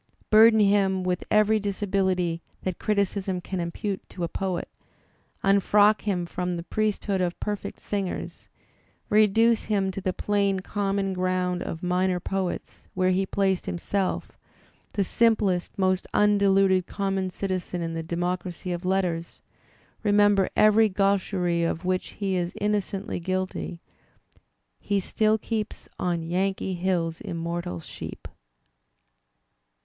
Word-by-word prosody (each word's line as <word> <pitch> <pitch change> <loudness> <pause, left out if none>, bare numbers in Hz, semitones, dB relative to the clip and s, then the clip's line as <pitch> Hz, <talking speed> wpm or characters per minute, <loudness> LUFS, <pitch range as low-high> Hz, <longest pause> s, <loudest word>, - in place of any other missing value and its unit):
Burden 220 +1 +7
him 195 -2 +3
with 180 0 -1
every 215 +1 +4
disability 190 -4 0 0.2
that 185 -2 -3
criticism 200 -3 0
can 185 +1 -5
impute 185 +3 -3
to 180 - -6
a - - +1
poet; 185 +1 -3 0.8
unfrock 205 +2 +4
him 180 -4 0
from 180 0 -3
the 170 - -5
priesthood 205 -1 -1
of 175 -1 -1
perfect 210 -1 -4
singers; 195 -3 -4 0.6
reduce 215 +2 +4
him 195 -3 +1
to 195 - -6
the 185 - 0
plain 200 0 0
common 195 -1 -1
ground 180 -1 0
of 165 -1 -5
minor 180 0 +1
poets, 190 0 -4
where 185 0 +2
he 190 +1 +1
placed 190 -2 0
himself, 185 +2 -2 0.6
the 200 - +2
simplest, 205 -4 +1
most 185 -1 +1
undeluded 195 -3 +4
common 195 -2 -1
citizen 185 -2 -3
in 165 0 -3
the 165 - -3
democracy 175 +2 -3
of 175 +1 -3
letters; 180 -3 -1 0.6
remember 205 -2 +4
every 215 +1 +5
gaiicherie 185 -3 +1
of 165 +1 -2
which 185 0 -1
he 195 -2 -2
is 175 -1 -2
innocently 205 -1 -1
guilty: 185 -1 -3 1.0
he 200 -1 0
still 215 +3 +1
keeps 220 0 -4
"on 175 -2 -1
Yankee 190 +3 -1
hills 175 -2 -1
immortal 170 - -4
sheep." - - -8
190 Hz, 125 wpm, -26 LUFS, 180-205 Hz, 1.0 s, Burden